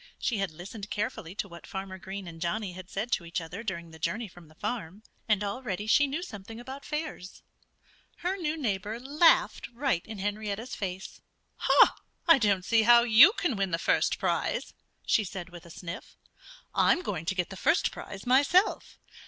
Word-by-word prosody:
She 225 -5 -1
had 195 -1 0
listened 195 +6 -9
carefully 200 -4 -3
to 205 - -3
what 170 -2 -12
Farmer 190 -1 -6
Green 190 0 -7
and 165 -1 -10
Johnnie 185 +2 -2
had 185 +1 -10
said 215 +5 -3
to 185 - +1
each 170 +1 -3
other 170 +5 -7
during 170 -6 -5
the 160 - -13
journey 190 +9 -2
from 175 -3 -15
the 155 - -20
farm. 205 -1 -4 0.3
And 210 -1 +3
already 205 -1 -3
she 285 +6 +4
knew 300 +6 -3
something 225 - -9
about 265 +3 -8
fairs. 300 - -5 0.8
Her 370 +2 +1
new 320 -4 -2
neighbor 215 -4 -2
laughed 295 +6 +3
right 245 -7 0
in 220 -1 -7
Henrietta's 205 +4 -3
face. 190 -1 -5 1.1
"I 330 -4 +7
don't 200 -5 +2
see 225 +2 +4
how 235 +1 +7
you 240 - +8
can 350 - -1
win 195 -2 0
the 165 - 0
first - - +2
prize," - - -1 0.3
she 215 - +3
said 185 -2 -6
with 175 -1 -12
a - - -13
sniff. 170 +3 -8 0.6
"I'm 360 - +3
going 175 - -3
to 190 - -1
get 180 0 -1
the - - -6
first 320 - +2
prize 195 0 -9
myself. 285 +10 +3
205 Hz, 185 wpm, -29 LUFS, 180-245 Hz, 1.1 s, you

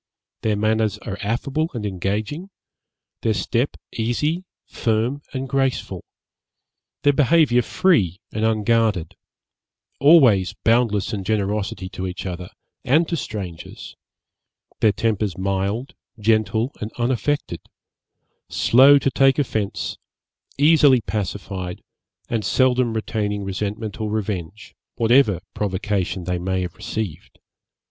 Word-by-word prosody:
Their 110 -1 +1
manners 110 0 +1
are 100 -3 -7
affable 135 +9 -1
and 110 -3 -3
engaging; 105 - -3 0.7
their 110 -2 +1
step 115 +7 -1 0.2
easy, 150 +10 -1 0.2
firm, 115 +5 -1
and 135 0 -4
graceful; 135 0 -1 1.0
their 145 - +5
behaviour 145 -3 +4
free 120 - +2
and 110 - -2
unguarded; 110 -5 +1 0.8
always 125 - +5
boundless 115 -4 +2
in 100 -2 -3
generosity 100 -1 -1
to 95 0 -5
each 90 +1 -6
other, 90 -1 -5 0.3
and 155 +6 +3
to 170 - 0
strangers; 100 - -7 0.8
their 110 - +4
tempers 105 -2 -1
mild, 100 +6 -2 0.3
gentle, 110 +3 +1
and 105 +1 -4
unaffected; 130 +4 -1 0.9
slow 135 +4 +6
to 135 -1 0
take 135 0 +4
offence, 110 -8 -2 0.6
easily 145 -3 +5
pacified, 95 -3 -4 0.4
and 115 -2 -1
seldom 125 -2 +2
retaining 105 -2 -2
resentment 105 +3 -4
or 110 - -1
revenge, 105 -1 -4 0.2
whatever 115 -5 +3
provocation 95 -2 -2
they 90 0 -2
may 95 +1 -1
have 90 - -5
received. 95 -6 -5
110 Hz, 110 wpm, -22 LUFS, 100-130 Hz, 1.0 s, slow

